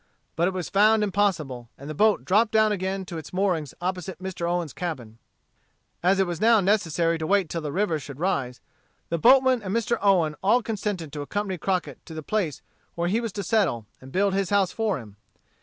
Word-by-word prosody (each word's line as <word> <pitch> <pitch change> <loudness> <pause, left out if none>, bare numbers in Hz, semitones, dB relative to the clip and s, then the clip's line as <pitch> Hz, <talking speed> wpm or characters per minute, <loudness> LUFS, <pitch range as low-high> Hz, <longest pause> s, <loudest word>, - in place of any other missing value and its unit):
But 170 +2 +2
it 190 - -1
was 180 -2 -3
found 215 +2 +4
impossible, 165 - -1
and 140 - -10
the 155 - -4
boat 210 +6 +2
dropped 210 +4 +3
down 220 -1 +4
again 190 -1 -2
to 170 -3 -6
its 155 - -11
moorings 180 -6 -1
opposite 185 +1 -3
Mr. 185 -2 -4
Owen's 175 -5 -2
cabin. 125 -11 -6 0.8
As 190 +3 +3
it 195 - +4
was 175 0 -5
now 225 0 +6
necessary 170 -4 +1
to 160 - -3
wait 195 -4 +2
till 165 - -3
the 150 -2 -4
river 175 -2 0
should 140 -1 -9
rise, 140 -9 -1 0.5
the 170 - -1
boatmen 260 +3 +5
and 195 0 -3
Mr. 230 +1 0
Owen 180 -6 +3
all 230 +5 +3
consented 200 -8 -3
to 150 - -4
accompany 190 +4 -3
Crockett 185 +2 -2
to 160 - -9
the 155 - -6
place 180 -6 -2 0.3
where 170 0 -1
he 220 +5 +1
was 230 -2 -3
to 200 - -4
settle, 180 - +1 0.2
and 130 +1 -12
build 195 +3 +1
his 195 -2 0
house 200 -3 +2
for 220 -4 -1
him. 105 -5 -12
185 Hz, 205 wpm, -25 LUFS, 160-205 Hz, 0.8 s, now